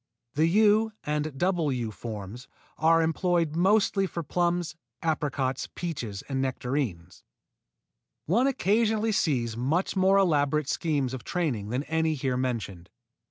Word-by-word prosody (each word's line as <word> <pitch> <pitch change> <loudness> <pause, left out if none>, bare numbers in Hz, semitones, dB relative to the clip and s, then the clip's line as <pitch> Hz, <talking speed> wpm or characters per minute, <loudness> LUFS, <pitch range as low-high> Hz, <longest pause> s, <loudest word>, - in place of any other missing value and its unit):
The 155 +3 +3
U 215 +4 +4
and 150 -1 -2
double 175 -3 +1
U 120 -4 -2
forms 110 +2 -7 0.3
are 165 +1 +4
employed 165 -1 +1
mostly 195 +2 +3
for 170 -2 -5
plums, 175 0 -1 0.3
apricots, 140 -5 -1
peaches 120 - -4
and 135 -1 -1
nectarines. 125 - -3 1.0
One 230 - +3
occasionally 220 -2 +1
sees 125 - 0
much 145 - 0
more 190 +1 +4
elaborate 150 -5 +2
schemes 145 -6 0
of 130 - -6
training 135 - -2
than 125 +4 -1
any 160 0 0
here 130 -2 -1
mentioned. 110 -8 -3
155 Hz, 125 wpm, -27 LUFS, 130-180 Hz, 1.0 s, U